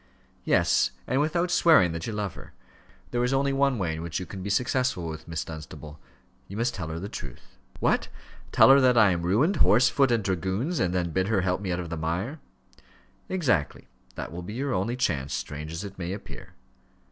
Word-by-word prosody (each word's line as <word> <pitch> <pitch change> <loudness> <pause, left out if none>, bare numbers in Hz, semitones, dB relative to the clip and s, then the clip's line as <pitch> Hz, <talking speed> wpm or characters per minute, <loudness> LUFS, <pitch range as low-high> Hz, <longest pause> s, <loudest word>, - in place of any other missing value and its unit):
"Yes, - - +3 0.2
and 130 +3 +1
without 170 +3 0
swearing 160 - +5
that 85 0 -5
you 110 - -3
love 105 -3 -3
her. - - -13 0.6
There 120 - 0
is 125 +2 +1
only 140 0 +1
one 135 -2 +2
way 90 -6 -1
in 80 - -5
which 85 0 -3
you 90 - -5
can 95 0 -8
be 100 - -4
successful 125 -3 0
with 80 -1 -7
Miss 85 -1 -4
Dunstable 75 -1 -9 0.5
you 100 - -8
must 120 +1 0
tell 90 -5 -5
her 80 +1 -5
the 100 - -5
truth." 70 - -10 0.2
"What! - - +1 0.4
tell - - +7
her 140 0 +7
that 125 -2 +4
I 105 -4 +6
am 85 -1 -1
ruined, 120 - +2
horse, 120 -3 +5
foot, 135 -3 +2
and 115 -3 +1
dragoons, 95 - -1
and 90 - +1
then 90 -2 -1
bid 95 +4 0
her 105 -3 +2
help 90 +1 -1
me 95 -3 -3
out 90 - -1
of 85 -1 -6
the 85 - -3
mire?" 90 - -3 0.9
"Exactly: 130 - 0 0.3
that - - -6
will 85 +2 -6
be 90 +4 -7
your 135 +2 -2
only 100 +6 -1
chance, 70 - -1
strange 75 +1 -5
as 85 +4 -5
it 100 -1 -9
may 90 +1 -3
appear." 100 - -10
95 Hz, 215 wpm, -26 LUFS, 85-125 Hz, 0.9 s, tell